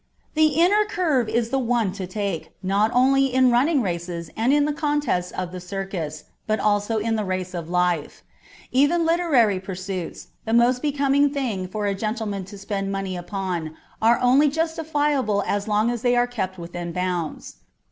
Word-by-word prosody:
The 310 0 +5
inner 400 +5 +5
curve 310 - 0
is 230 +1 0
the 270 - +1
one 235 -5 +1
to 190 -1 -6
take, 195 -3 -4
not 200 +3 +2
only 270 +2 +4
in 255 0 +4
running 270 +3 +3
races 170 -2 -4
and 230 +4 +2
in 290 0 +4
the 300 - 0
contests 290 - 0
of 185 -1 -5
the 185 - -6
circus, 180 -5 -5 0.2
but 215 0 +1
also 205 +1 +1
in 225 +1 0
the 215 - -1
race 185 -1 -3
of 170 -2 -5
life; 180 -3 0 0.5
even 290 +6 +3
literary 295 - +3
pursuits, 185 -2 -6
the 225 - -2
most 245 +1 +4
becoming 285 -1 +2
thing 240 -10 -2
for 210 +3 -3
a 200 - +1
gentleman 210 -1 -3
to 200 +2 -11
spend 195 0 -3
money 195 -1 -3
upon, 175 -3 -4 0.2
are 230 +2 +4
only 265 +4 +5
justifiable 295 - 0
as 205 +1 -1
long 215 +2 +2
as 240 -2 -4
they 245 0 +2
are 245 0 +4
kept 190 -6 -4
within 175 0 -6
bounds. 180 -3 -3
215 Hz, 175 wpm, -23 LUFS, 185-270 Hz, 0.5 s, The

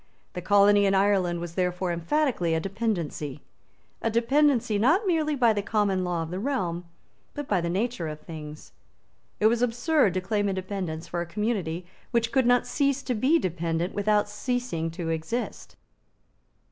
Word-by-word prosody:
The 180 - -5
colony 205 +1 +5
in 195 - +2
Ireland 190 -3 +2
was 170 -1 -6
therefore 180 0 -1
emphatically 175 - 0
a - - +1
dependency; 175 - -3 0.6
a 225 - +1
dependency, 235 -1 +2
not 320 - +3
merely 315 -5 +1
by 240 -4 +4
the 205 - -1
common 200 -3 0
law 175 -2 -1
of 160 - -7
the 180 - -3
realm, 185 -9 -2 0.5
but 290 -1 -5
by 190 -4 +1
the 170 - -2
nature 195 -1 -1
of 155 0 -6
things. 155 -2 -9 0.7
It 215 - +1
was 230 +2 +4
absurd 245 - +2
to - - +2
claim 205 +2 0
independence 185 -4 -4
for 175 - -3
a - - -3
community 185 -4 -2 0.2
which 230 -2 0
could 260 -3 +3
not 245 -1 +4
cease 280 -2 0
to 250 - -1
be 260 +9 +3
dependent 170 - -2
without 205 0 +2
ceasing 210 -6 -2
to 165 0 -5
exist. 165 +9 -4
200 Hz, 165 wpm, -26 LUFS, 175-240 Hz, 0.7 s, colony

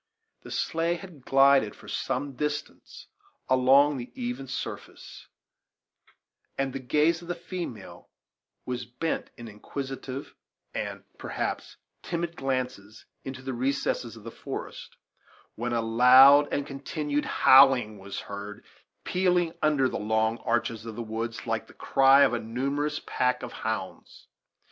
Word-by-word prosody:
The - - -12
sleigh 165 +1 -1
had 170 -7 -12
glided 135 -5 +4
for - - -16
some 135 +2 -3
distance 150 +2 -5 0.4
along 135 +3 +5
the 120 0 -7
even 245 - -4
surface, 130 - -7 1.3
and 135 -1 -1
the 135 - -4
gaze 150 +6 +2
of 170 - -12
the 175 - -2
female 170 - -8 0.6
was 125 -1 -3
bent 125 +7 -3
in 120 - -9
inquisitive 135 +5 -7 0.4
and, - - -4 0.2
perhaps, - - -4 0.2
timid 170 -1 -3
glances 130 -6 -4 0.2
into 130 0 -7
the 130 0 -4
recesses 125 -2 -1
of 110 - -13
the 115 - -7
forest, - - -8 0.6
when 120 +2 -4
a 115 -1 0
loud 130 +5 +7
and 140 - -1
continued 145 +1 -3
howling 130 -6 +5
was 100 +1 -6
heard, 100 +1 -8 0.4
pealing 180 -2 +1
under 150 -4 +3
the - - -4
long 110 +2 0
arches 115 -1 -1
of 115 -1 -7
the 120 - -4
woods 115 +1 -5
like 115 -1 -2
the - - -16
cry 135 +1 +5
of - - +3
a 120 - 0
numerous 140 +6 -2
pack 125 0 0
of - - -6
hounds. - - -5
130 Hz, 135 wpm, -27 LUFS, 115-145 Hz, 1.3 s, loud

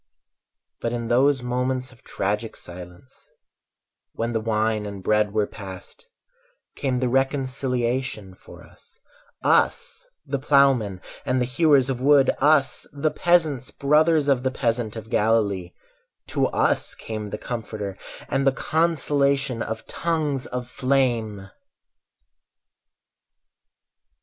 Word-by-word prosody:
But 115 - -2
in 120 -1 -3
those 130 +2 +3
moments 125 +1 -1
of 120 - -20
tragic 105 +3 -3
silence, 90 +6 -12 0.8
When 115 +1 -2
the 115 - +1
wine 110 -1 0
and 100 -2 -8
bread 105 +1 +2
were 105 0 +1
passed, 100 - -10 0.7
Came 130 -3 -1
the 130 - 0
reconciliation 130 -4 -1
for - - -15
us— - - -21 0.4
Us - - +1 0.2
the 140 0 -2
ploughmen 130 -9 +3 0.2
and 130 -2 0
the 125 - +1
hewers 140 0 +3
of 130 -2 -3
wood, 140 -1 +5
Us 145 -1 +2
the 150 +2 -1
peasants, 155 -6 +2
brothers 150 +1 +3
of 135 -3 +3
the 130 - 0
peasant 115 -3 -1
of 110 -1 -7
Galilee— 100 -5 +1 0.6
To - - +1
us - - 0
came 110 -2 -6
the 105 - -4
Comforter 110 -5 -5 0.3
And 135 -1 0
the - - +6
consolation 140 -4 +1
of 110 - -4
tongues 155 -6 -1
of 125 -1 -5
flame! 120 -7 0
125 Hz, 120 wpm, -24 LUFS, 110-140 Hz, 0.8 s, the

